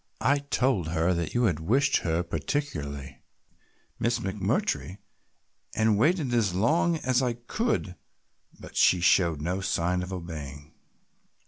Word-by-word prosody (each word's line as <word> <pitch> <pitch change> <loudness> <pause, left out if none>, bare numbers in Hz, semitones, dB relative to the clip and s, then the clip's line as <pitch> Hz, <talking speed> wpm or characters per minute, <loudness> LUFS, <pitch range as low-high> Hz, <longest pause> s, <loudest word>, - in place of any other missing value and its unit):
"I 145 +1 +2
told 130 - 0
her 85 +2 +1
that 85 +2 -3
you 120 - +2
wished 110 - +2
her 85 0 -1
particularly, 75 - -4 0.8
Miss 115 +1 +1
McMurtry, 100 - -2 0.8
and 110 -1 +3
waited 150 - +2
as 105 -6 +1
long 160 - +2
as 130 -3 +1
I 125 -2 0
could, 120 - -2 0.6
but - - -12
she 90 - +4
showed 85 -4 +3
no 90 +4 -2
sign 90 -1 0
of 90 +1 -6
obeying." 80 -4 -7
95 Hz, 125 wpm, -27 LUFS, 85-130 Hz, 0.8 s, she